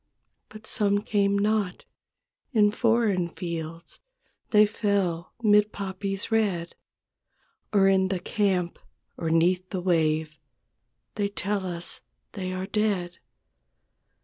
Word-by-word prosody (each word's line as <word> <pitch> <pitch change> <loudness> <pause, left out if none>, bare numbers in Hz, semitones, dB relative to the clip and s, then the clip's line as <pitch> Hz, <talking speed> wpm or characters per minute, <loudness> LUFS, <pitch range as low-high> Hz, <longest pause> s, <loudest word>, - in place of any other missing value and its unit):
But 215 0 -12
some 205 -1 +2
come 200 -2 +1
not; 205 -2 0 0.7
in 210 -3 +4
foreign 220 -6 +2
fields 165 -1 -6 0.5
They 210 -1 +6
fell 200 -5 -1
'mid 210 0 +5
poppies 195 +1 -3
red. 195 -6 0 1.0
Or 195 -2 +4
in 190 -1 +4
the 190 -1 -2
camp 185 -4 0 0.4
or 165 - -3
'neath 180 +3 +2
the 190 - -3
wave; 160 -3 0 0.7
They 205 -1 -1
tell 200 -1 -2
us 170 -1 -5 0.3
they 185 -2 -4
are 185 0 -3
dead. 195 -4 -1
195 Hz, 110 wpm, -26 LUFS, 175-210 Hz, 1.0 s, They